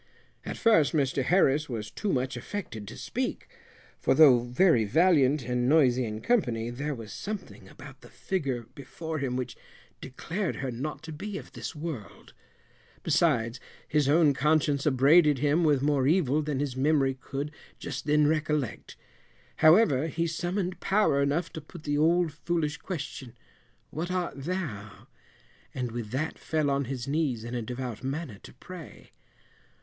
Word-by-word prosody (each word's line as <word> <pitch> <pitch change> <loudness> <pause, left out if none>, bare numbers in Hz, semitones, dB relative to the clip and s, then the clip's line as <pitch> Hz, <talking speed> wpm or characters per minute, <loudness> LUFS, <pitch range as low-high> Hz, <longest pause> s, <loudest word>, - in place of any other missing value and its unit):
At - - -5
first 215 -11 +4
Mr 140 -3 +1
Harris 150 -1 +2
was 110 -3 -5
too 210 - -2
much 130 -1 -1
affected 120 - -6
to - - -9
speak, - - -3 0.5
for - - +2
though 140 -5 +8
very 125 +2 +3
valiant 145 - +3
and 125 +1 0
noisy 130 -5 +4
in 110 0 -5
company, 120 - 0
there 140 +4 -3
was 115 -3 -9
something 210 -1 -7
about - - -13
the - - -14
figure 135 -11 -3
before 155 +3 -6
him 130 -3 -2
which 125 -1 -4 0.5
declared 170 +8 -4
her 135 -1 -3
not 135 +8 -5
to 160 - -7
be 195 +6 -5
of - - -10
this - - -7
world: 150 -9 -7 0.7
besides, 140 -8 +1 0.3
his 150 -2 +1
own 155 -1 +5
conscience 150 0 +1
upbraided 145 +3 +5
him 145 +5 +2
with 145 -4 +3
more 140 -3 +2
evil 155 -3 +2
than 150 -3 -2
his 140 -3 -2
memory 135 0 +2
could 140 +2 -5 0.3
just 135 -2 -6
then 150 0 +4
recollect. 150 -4 -1 0.6
However, 155 - +5
he 165 +2 -1
summoned 175 +3 -2
power 195 -8 +2
enough 145 +5 0
to 160 - -6
put 155 +2 -13
the 145 -1 0
old 170 +1 +3
foolish 160 -1 -2
question, 140 -8 -7 0.5
"what 165 +4 -4
art 175 -7 -3
thou?" 135 - -5 0.7
and 125 -3 -3
with 115 -2 -5
that 140 +7 -3
fell 155 -3 0
on 140 0 0
his 130 0 -5
knees 140 -6 -1
in 120 +1 -6
a 120 - -2
devout 125 0 -5
manner 135 -6 -4
to - - -13
pray. 175 +4 -11
145 Hz, 155 wpm, -28 LUFS, 130-160 Hz, 0.7 s, though